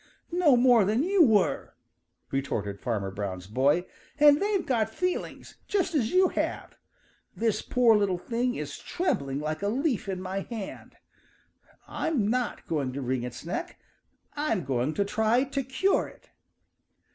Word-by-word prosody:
"No 335 -7 +4
more 240 -3 +5
than 215 +7 +1
you 375 0 +4
were!" 215 - +2 0.6
retorted 105 -7 -2
Farmer 100 -5 -2
Brown's 95 -2 -5
boy. 140 - +2 0.3
"And 295 0 +6
they've 400 -2 0
got 235 -7 +1
feelings 365 +11 -4
just 380 -3 0
as 245 -8 +1
you 370 0 +4
have. - - -3 0.6
This 225 -2 0
poor 240 -3 +4
little 200 -3 +1
thing 245 +6 -2
is - - -5
trembling 140 - -2
like 155 +2 -3
a 200 - 0
leaf 250 -2 -1
in 185 -1 -3
my 185 +1 -3
hand. 215 0 -7 0.9
I'm 260 -11 -1
not 245 +1 -1
going 140 -5 -2
to 140 - -4
wring 130 0 -1
its 120 +3 -7
neck. 170 - -4 0.5
I'm 290 - -1
going 130 +3 -1
to 200 - +1
try 220 +4 +2
to 275 0 -2
cure 270 +10 +1
it." - - -18
220 Hz, 150 wpm, -27 LUFS, -, 0.9 s, And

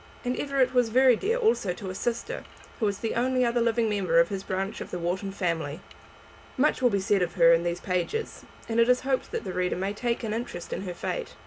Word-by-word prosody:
And 250 +1 0
Everett 275 -2 +1
was 245 -2 +3
very 255 +1 +5
dear 440 - 0
also 440 - +1
to 190 +1 -6
a - - -6
sister, 235 +4 -3 0.4
who 220 - +2
was 200 -1 -1
the 225 +2 -2
only 255 +1 +1
other 235 0 +1
living 230 0 +2
member 205 +3 +2
of 250 -1 +4
this 195 -2 -3
branch 190 +1 -3
of - - -6
the - - -4
Wharton 180 +3 -2
family. 165 -5 -2 0.8
Much 280 0 +2
will 250 - +5
be 200 -3 +1
said 195 0 +1
of 175 -1 -1
her 170 -2 +7
in 165 - +3
these 175 0 -2
pages, 185 - -2 0.2
and 230 0 0
it 230 +1 +4
is 250 0 +4
hoped 265 -1 -1
that - - -4
the 185 - -5
reader 180 0 0
may 195 +2 -2
take 235 +3 -2
an 215 -2 -2
interest 225 -6 -5
in - - -3
her 180 -2 -5
fate. - - -4
220 Hz, 240 wpm, -27 LUFS, 185-250 Hz, 0.8 s, her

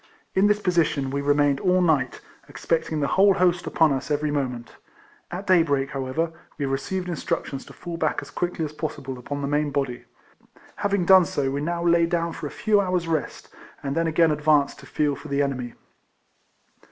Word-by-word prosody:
In 195 +2 +4
this 210 0 +2
position 165 -8 +1
we 140 +1 -1
remained 145 -1 +2
all 185 +2 +2
night, 155 -8 +1 0.3
expect 165 -1 -1
ing 155 -1 -1
the - - +2
whole 195 +3 +4
host 180 -2 +2
upon 160 -4 +3
us 135 +1 -4
every 150 0 0
moment. 125 -5 -3 0.6
At 185 +3 -6
day 185 -3 +5
break, 140 -4 0
however, 135 +5 -2 0.3
we 145 - -1
received 180 +8 -2
instruc 170 -4 -2
tions 135 -1 -7
to - - -13
fall 170 -1 -7
back 155 -2 0
as - - -12
quickly 175 -2 -2
as 150 - -7
possible 140 -4 -5
upon 145 +3 -5
the - - -1
main 145 +1 +1
body. 135 -3 -3 0.7
Having 200 -3 0
done 185 -1 +7
so, 140 -3 -1
we 140 +1 -2
now 170 +2 -2
lay 170 -1 +4
down 170 -1 -1
for 155 - -5
a - - -6
few 210 +3 +2
hours' 180 -3 -1
rest, 160 -3 -3 0.3
and 140 0 -2
then 165 0 +1
again 160 0 +3
advanced 150 -1 +2
to - - -13
feel 145 -2 0
for - - -10
the 140 +1 +1
enemy. 125 -4 -3
155 Hz, 200 wpm, -24 LUFS, 140-175 Hz, 0.7 s, done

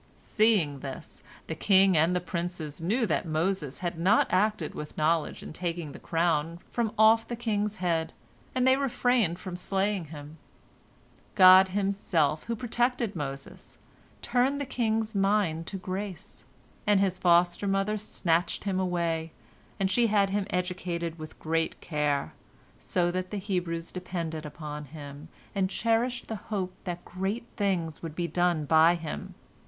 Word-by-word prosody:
Seeing 205 -11 +2
this, 135 +4 -8 0.2
the - - -4
king 190 +2 +4
and 165 +3 +3
the - - +2
princes 170 -3 -5
knew 225 +9 +1
that 170 -2 -1
Moses 160 -2 -1
had 170 -1 -2
not 195 +6 +4
acted 190 -3 +1
with 150 - -8
knowledge 160 +1 +1
in - - -8
taking 170 -3 -4
the - - -10
crown 165 -1 0
from 235 -3 0
off 220 +1 +5
the 240 - -3
king's 210 -3 -1
head, 170 -4 -1 0.4
and 255 0 +2
they 260 0 +6
refrained 245 -8 +1
from 185 -1 -6
slaying 195 0 -1
him. 150 0 -10 1.0
God 185 -1 +9
Himself, 185 -6 0
who 235 - -2
protected 240 -2 0
Moses, 140 -3 -7 0.5
turned 260 +3 +1
the 285 - -2
king's 225 -3 -1
mind 195 -5 +1
to 195 - -4
grace, 190 0 -6 0.4
and 205 -1 +5
his 190 -2 +1
foster 175 +2 +3
mother 195 +2 +1
snatched 175 -4 0
him 190 -2 -1
away, 170 -3 -1 0.5
and 195 -1 +1
she 235 +4 +4
had 200 -2 +2
him 200 0 -1
educated 175 -3 -3
with 155 0 -9
great 165 0 -1
care, 150 - -1 0.5
so 175 -1 0
that 185 0 -3
the 210 - -4
Hebrews 180 -4 -3
depended 170 -4 -4
upon 150 -1 -7
him, 145 +1 -10 0.2
and 190 -2 +1
cherished 235 +4 0
the 220 - -4
hope 190 -4 -2
that 175 -1 -5
great 195 +6 -3
things 180 -6 -1
would 160 -2 -6
be 175 0 -1
done 175 -2 +1
by 160 +3 +5
him. 165 -2 -6
180 Hz, 150 wpm, -28 LUFS, 165-205 Hz, 1.0 s, God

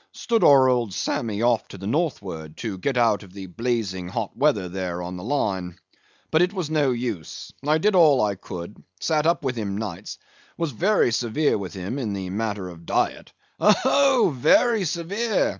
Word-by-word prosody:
"Stood 230 -4 0
our 135 -4 +7
old 120 -6 0
Sammy 110 -2 -2
off 120 -2 +2
to - - -10
the 95 - -8
northward, 100 - -3
to 105 -5 -5
get 130 +6 -1
out 115 -4 +3
of 95 -3 -14
the 95 -1 -8
blazing 100 -3 -2
hot 90 - -4
weather 135 -9 +2
there 90 -1 -4
on 90 +1 -6
the 90 - -8
Line. 95 -9 -2 0.5
But 160 - +4
it 180 +2 +2
was 175 -6 -3
no 150 -3 +2
use—I 125 - -3
did 205 +6 +2
all 155 -7 +6
I 105 -3 +2
could; 95 0 -9 0.2
sat 155 -1 +1
up 170 -1 +1
with 130 -1 -1
him 100 -4 -3
nights; 100 -3 -6 0.4
was 165 -3 -2
very 180 - +2
severe 125 +6 +1
with 100 -2 -5
him 95 +9 -4
in 110 -6 -2
the 95 -2 -4
matter 105 -2 -3
of 85 -2 -12
diet—" - - -1 0.3
"Oh, 255 - +4
very 230 - +3
severe!" 195 +7 0
120 Hz, 180 wpm, -24 LUFS, 95-155 Hz, 0.5 s, our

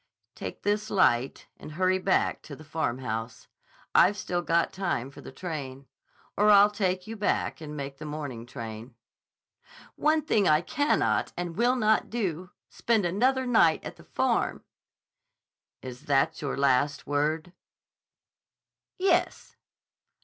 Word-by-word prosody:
"Take - - -8
this 210 +1 0
light 130 -9 +2
and 155 - -10
hurry 185 +2 +1
back 190 0 +1
to 145 - -10
the 155 - -13
Farmhouse. 125 -7 -4 0.5
I've 200 +4 +5
still 175 -3 -2
got 170 0 +1
time 175 -9 -2
for - - -13
the - - -10
train. 140 -4 -6 0.5
Or 210 +1 +3
I'll 205 0 +7
take 185 -3 -1
you 225 - -7
back 205 -5 -1
and 150 -1 -7
make 140 -1 -6
the 155 - -7
morning 145 -6 -6
train." 115 +1 -8 1.0
"One 310 0 +2
thing 215 - +2
I 155 +1 +4
cannot 290 - 0
and 175 -1 -4
will 245 +2 +2
not 220 -3 +2
do: 185 -6 -3 0.2
spend 225 -5 0
another 255 +9 +1
night 220 -10 +3
at - - -7
the - - -15
Farm." - - -1 1.2
"Is 125 -1 -9
that 140 +3 +1
your 140 -2 -3
last 140 +1 +1
word?" 155 +4 -1 1.4
"Yes." 380 +1 0
165 Hz, 135 wpm, -27 LUFS, 140-205 Hz, 1.4 s, I'll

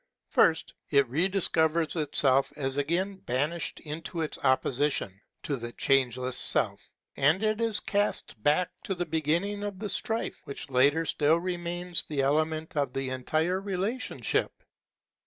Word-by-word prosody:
First, 160 - +3 0.2
it 140 -2 +4
rediscovers 165 -1 +2
itself 140 -3 +2
as 135 -2 -2
again 175 +7 0
banished 145 +2 -2
into 165 +2 -5
its 155 - -3
opposition 130 -6 +1 0.2
to 145 - -1
the 120 -1 -6
Changeless 130 -2 +1
Self; - - 0 0.3
and 155 +9 +3
it 215 +1 +1
is 225 -2 +1
cast 205 - -1
back 150 +8 +2
to 195 - -2
the 175 0 -2
beginning 165 +6 0
of 205 -2 -4
the 210 +1 -4
strife, 225 +3 -2
which 140 0 -7
latter 140 +6 +3
still 155 +1 +3
remains 175 0 0
the 145 -3 -2
element 155 +3 0
of 140 -4 0
the 135 -1 -3
entire 155 +8 0
relationship. 200 +5 -2
155 Hz, 140 wpm, -28 LUFS, 140-180 Hz, 0.3 s, it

